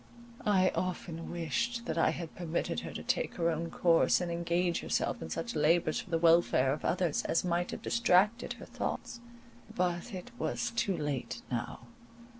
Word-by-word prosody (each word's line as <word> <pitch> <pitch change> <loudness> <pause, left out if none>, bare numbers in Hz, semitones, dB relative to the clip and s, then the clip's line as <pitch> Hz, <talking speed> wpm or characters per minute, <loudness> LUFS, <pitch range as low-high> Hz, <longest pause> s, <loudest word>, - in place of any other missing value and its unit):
I 185 -3 +4
often 170 -2 -3
wished 235 +8 -2
that 160 - -2
I 165 - +3
had 170 -2 -5
permitted 170 -2 -2
her - - -6
to - - -6
take - - -1
her 170 -1 +1
own 165 +1 -3
course, 165 -1 +4
and 175 -1 -2
engage 170 +1 0
herself - - -1
in - - -5
such 235 - -4
labours 155 +1 +3
for - - -8
the 165 - +2
welfare 165 -5 +4
of 150 - -6
others 175 -3 +1
as 165 - +1
might 175 0 0
have - - -6
distracted 180 - +3
her - - -11
thoughts. 235 - -4 0.6
But 175 +4 -1
it 190 +5 -7
was 240 - -1
too 230 -5 0
late 130 -7 -3
now. 120 -1 -3
170 Hz, 175 wpm, -31 LUFS, 160-185 Hz, 0.6 s, I